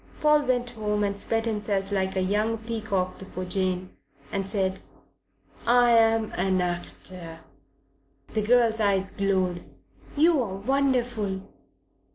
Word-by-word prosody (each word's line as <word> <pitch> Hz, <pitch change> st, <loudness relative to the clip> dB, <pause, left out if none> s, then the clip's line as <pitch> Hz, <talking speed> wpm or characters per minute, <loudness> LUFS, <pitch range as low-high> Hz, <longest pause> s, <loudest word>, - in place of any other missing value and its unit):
Paul 300 Hz, -1 st, +4 dB
went 245 Hz, -1 st, 0 dB
home 210 Hz, -2 st, -1 dB
and 200 Hz, 0 st, -1 dB
spread 225 Hz, +2 st, -1 dB
himself 205 Hz, -3 st, -1 dB
like 190 Hz, -1 st, 0 dB
a 190 Hz, -, +1 dB
young 210 Hz, +4 st, +1 dB
peacock 215 Hz, -5 st, -3 dB
before 185 Hz, -1 st, -6 dB
Jane, 185 Hz, 0 st, -1 dB, 0.4 s
and 195 Hz, -1 st, -2 dB
said: 190 Hz, -2 st, -1 dB, 0.9 s
"I 240 Hz, 0 st, +5 dB
am 225 Hz, -1 st, +4 dB
an 185 Hz, +1 st, +1 dB
actor." 175 Hz, -1 st, -4 dB, 0.9 s
The 215 Hz, -, +1 dB
girl's 230 Hz, 0 st, +3 dB
eyes 195 Hz, -2 st, +2 dB
glowed. 185 Hz, -3 st, 0 dB, 0.5 s
"You 320 Hz, -1 st, +4 dB
are 200 Hz, -6 st, -3 dB
wonderful." 245 Hz, -4 st, 0 dB
205 Hz, 125 wpm, -26 LUFS, 190-230 Hz, 0.9 s, I